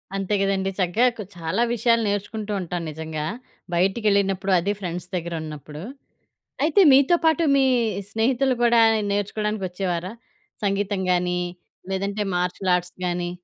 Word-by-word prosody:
అంతే 195 +1 -2
గదండీ. 195 -1 +1
చక్కగా 190 +8 +3
క్ - - -5 0.2
చాలా 165 +7 -1
విషయాలు 230 0 +2
నేర్చుకుంటూ 205 +1 -3
ఉంటాను 175 -1 -4
నిజంగా 155 0 -5 0.5
బయటికేళ్ళినప్పుడు 195 0 +1
అది 200 +4 -1
ఫ్రెండ్స్ 180 -1 -5
దగ్గర 170 -1 -3
ఉన్నప్పుడు. 150 0 -8 0.8
అయితే 325 +6 +4
మీతో 280 +6 +5
పాటు 320 +1 +3
మీ 270 - +4 0.5
స్నేహితులు 250 +4 +1
కూడా 235 -1 +5 0.3
నేర్చుకోవడానికి 205 0 -1
వచ్చేవారా? 180 +1 -3 0.5
సంగీతం 200 0 0
గాని, 180 0 0 0.5
లేదంటే 200 +2 -2
మార్షిల్ 180 +1 0
ఆర్ట్స్ 180 0 -6
గాని. 175 0 -2
195 Hz, 125 wpm, -23 LUFS, 175-215 Hz, 0.8 s, మీతో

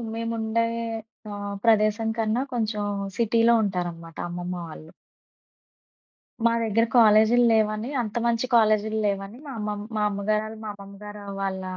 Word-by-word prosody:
మేముండే 230 0 -1 0.7
ఆహ్, 205 0 -5
ప్రదేశం 215 0 +3
కన్నా 225 +3 +1
కొంచెం 215 -2 -1 0.4
సిటీలో 230 +1 +4
ఉంటారన్నమాట 175 -4 -4
అమ్మమ్మ 175 +1 -4
వాళ్ళు. 155 +1 -11 1.6
మా - - +5
దగ్గర 225 +1 +2
కాలేజీ‌ల్లేవని, 220 0 +4
అంత 220 -1 -4
మంచి 235 +1 +1
కాలేజీ‌ల్లేవని, 215 -1 +1
మా 275 - -6
అమ్మమ్మ 210 0 -4
మా 210 - +1
అమ్మగారు 210 +1 0
వాళ్ళు 220 0 -8
మా - - -5
అమ్మమ్మ 200 -1 -12
గారు 210 0 -8 0.2
వాళ్ళ 190 -1 -2
215 Hz, 120 wpm, -25 LUFS, 200-225 Hz, 1.6 s, మా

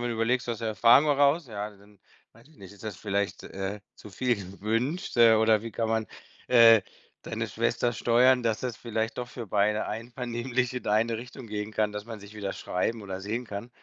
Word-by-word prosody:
mal - - -2
überlegst, 120 +2 0
aus 115 - -2
der 115 -1 -3
Erfahrung 115 +7 +6
heraus. 145 +2 +3
Ja, 105 -1 -4
dann 100 0 -20 0.3
weiß 115 +6 -20
ich 155 - -22
nicht, 95 -2 -12
ist 100 - -16
das 105 -4 -5
vielleicht, 100 -3 -2
äh, 95 +2 -5
zu - - -13
viel 120 +5 0
gewünscht, 110 - -3
äh, 115 -1 +8
oder 110 -1 +4
wie 115 - -6
kann 115 0 -2
man, 110 -1 0 0.4
äh, 115 -2 +8 0.4
deine - - -4
Schwester 120 0 0
steuern, 125 +2 +4
dass 115 -2 0
das 125 -4 -4
vielleicht 110 0 -3
doch 120 0 -4
für 120 -3 -7
beide 105 +2 +1
einvernehmlich 120 +2 -3
in 125 - -6
eine 110 +2 +2
Richtung 120 +1 -9
gehen 105 0 -5
kann, 105 -1 0
dass 105 +1 -6
man 110 -3 -8
sich 100 +1 -13
wieder 100 -2 -4
schreiben 110 +5 -2
oder 95 -1 -6
sehen 110 +5 -3
kann. 100 +4 -6
110 Hz, 205 wpm, -27 LUFS, 105-120 Hz, 0.4 s, äh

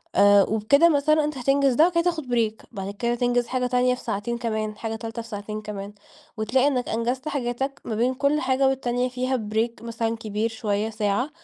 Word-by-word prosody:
آآ 205 0 +6
وبكده 220 - +4
مثلًا 305 0 +3
أنت 300 -2 -3
هتنجز 275 +1 +2
ده، 315 +7 +5
وبعد 360 - -4
كده 335 0 +2
تاخد 335 -4 -1
break 230 -3 -1
بعد 195 0 -5
كده 235 +3 -1
تنجز 245 0 +1
حاجة 250 0 -1
تانية 250 0 +2
في - - -13
ساعتين 230 +2 -2
كمان، 215 -2 -3
حاجة 225 -1 -4
تالتة 225 +1 -6
في 230 - -12
ساعتين 215 0 -6
كمان، 205 -1 -7 0.4
وتلاقي 255 +5 +2
إنَّك 255 -4 0
أنجزت 245 +5 -2
حاجاتك 270 -1 -3
ما 225 - -3
بين 245 +4 +1
كل 280 +3 +1
حاجة 260 +1 +2
والتانية 250 -2 0
فيها 255 +1 -1 0.2
break 230 +1 -1
مثلًا 230 -1 -2
كبير 215 +1 -2
شوية 215 -1 -2
ساعة، 215 +4 -1
240 Hz, 200 wpm, -24 LUFS, 220-265 Hz, 0.4 s, آآ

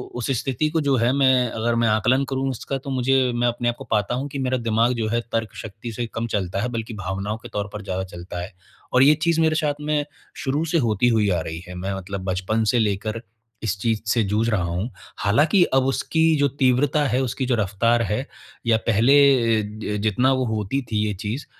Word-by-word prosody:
उस 125 - -3
स्थिति 135 +3 -1
को 160 0 0
जो 140 -2 +2
है 120 +2 +2
मैं, 130 -3 +3
अगर 115 +1 -1
मैं 115 - +3
आकलन 115 +5 +2
करूँ 135 0 -1
उसका 135 +2 -4
तो 135 +1 -8
मुझे 130 0 +2
मैं 120 0 +1
अपने 120 0 0
आपको 120 - -5
पाता 105 +2 +1
हूँ 135 +3 -3
कि 140 0 -5
मेरा 130 0 0
दिमाग़ 115 +1 +1
जो 115 -2 -2
है 115 +1 0
तर्क 115 -1 -2
शक्ति 110 +2 -7
से 120 +3 -3
कम 115 +1 -2
चलता 100 -2 -2
है, 125 - -1
बल्कि 115 -1 -4
भावनाओं 100 +2 -4
के 120 +1 -11
तौर 105 0 -2
पर 105 - -5
ज़्यादा 95 -1 -3
चलता 90 -1 -7
है। 95 - -8 0.4
और 130 +1 +6
ये 150 +2 +6
चीज़ 170 -1 +2
मेरे 160 -1 +3
साथ 150 -2 +1
में 150 -1 0 0.4
शुरू 145 +3 0
से 165 +1 +1
होती 110 +2 +2
हुई 110 -3 +2
आ 90 -3 +1
रही 80 +1 -5
है, 90 - -8
मैं 95 +2 -3
मतलब 95 0 -6
बचपन 95 +4 0
से 120 - +3
लेकर 110 +1 -1 0.4
इस 100 -3 -1
चीज़ 110 0 0
से 115 -1 +3
जूझ 105 +3 0
रहा 105 -5 +1
हूँ। 90 +7 -2 0.3
हालाँकि 145 - +4
अब 135 -1 +4
उसकी 145 +4 0 0.2
जो 145 - +3
तीव्रता 135 +2 +2
है, 130 +1 +1
उसकी 130 +1 -2
जो 125 -1 +1
रफ़्तार 110 +3 +1
है, 115 +5 -2 0.4
या 115 -1 +4
पहले 120 -1 +4
ज 105 0 -4
जितना 110 +5 +2
वो 130 -1 0
होती 110 +4 -1
थी 110 - 0
ये 105 - -1
चीज़ 105 +8 -5
115 Hz, 220 wpm, -23 LUFS, 105-130 Hz, 0.4 s, और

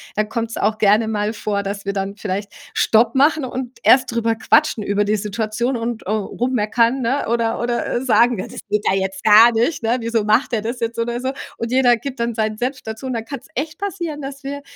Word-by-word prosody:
Dann 215 0 0
kommt's 230 -1 -3
auch 215 +1 0
gerne 215 +1 +3
mal 210 0 -1
vor, 205 -2 -2
dass 200 0 -4
wir 200 - -2
dann 195 0 -3
vielleicht 200 0 -4 0.2
Stopp 225 +1 +3
machen 290 +3 +3
und 260 0 -5
erst 255 -1 +5
drüber 230 -1 +1
quatschen 240 +1 +2
über 205 +1 +1
die 210 +1 +1
Situation 220 +4 -2
und, 230 -1 -3
äh, - - -8
rummeckernn, 230 +3 0
ne? 260 +4 0
Oder 230 0 0
oder 240 0 -1
sagen: 235 -2 +3
„Ja, - - -3
das - - -9
geht 210 0 0
ja 190 - +2
jetzt 190 0 -3
gar 220 +2 +8
nicht, 240 +5 0
ne? 230 +2 +1
Wieso 230 -1 0
macht 215 +5 +2
der 220 - +1
das 235 +3 -4
jetzt?“ 230 0 -3
Oder 235 +1 -1
so 260 +1 -2 0.3
und 230 - -3
jeder 250 -1 +4
gibt 255 +1 -6
dann 235 0 -1
seinen 215 -1 -1
Senf 255 +3 -3
dazu 220 +4 -7
und 255 - -2
dann 225 -1 -4
kann's 275 +1 -8
echt 305 +2 -4
passieren, 345 -6 -4
dass 275 +1 -7
wir 285 +1 -4
230 Hz, 225 wpm, -20 LUFS, 215-255 Hz, 0.3 s, gar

